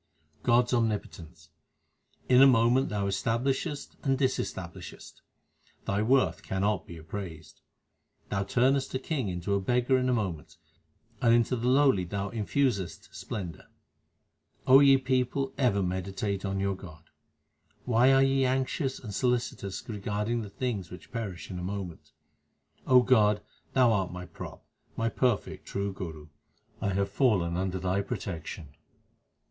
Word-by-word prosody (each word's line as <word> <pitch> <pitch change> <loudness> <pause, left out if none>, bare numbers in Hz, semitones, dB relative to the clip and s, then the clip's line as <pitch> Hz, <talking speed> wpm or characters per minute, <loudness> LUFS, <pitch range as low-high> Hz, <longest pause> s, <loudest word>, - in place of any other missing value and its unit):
God 120 0 +4
s 125 - -4
omnipotence: 95 -8 -2 0.8
In 125 0 +6
a 135 - +9
moment 125 +1 +4
Thou 100 -1 -1
establishest 130 - -1
and 135 -1 +1
discs 130 -1 0
tablishest; 90 -2 -10 0.6
Thy 100 +1 0
worth 130 +4 +2
cannot 100 +2 -1
be 85 - -9
appraised. 80 -1 -8 0.7
Thou 100 - 0
turnest 130 +6 +1
a - - +3
king 135 -3 -2
into 90 +2 -2
a 100 - +2
beggar 125 +5 +2
in 130 0 0
a - - +3
moment, 90 -7 -3 0.6
and 115 -1 +5
into 120 +2 +2
the 120 0 -2
lowly 130 -7 +4
Thou 100 +2 -3
infusest 110 -3 -1
splendour. 90 -6 -6 1.0
ye 135 +1 +8
people, 130 +1 0
ever 100 -7 +2
meditate 95 +2 -2
on 95 0 -2
your 100 0 0
God. 80 -4 -12 0.8
Why 125 +2 +4
are 135 0 +5
ye 135 0 +2
anxious 130 +2 0
and 105 -4 -8
solicitous 120 -5 -1
regarding 105 +2 -2
the 105 - -7
things 105 -4 -3
which 90 +5 -12
perish 100 -10 -5
in 90 - -5
a - - -5
moment? 95 -3 -6 0.8
O 125 -1 +7
God, 105 -5 +3 0.3
Thou 125 -3 +5
art 95 -4 0
my 90 0 -7
prop, - - -10 0.3
my 115 0 +1
perfect 120 -3 -1
True 100 0 -2
Guru; 80 -5 -7 0.5
I 100 - 0
have 100 0 0
fallen 95 -10 +2
under 95 +1 -1
Thy 95 +2 0
protection. 80 -5 -6
105 Hz, 140 wpm, -29 LUFS, 95-125 Hz, 1.0 s, a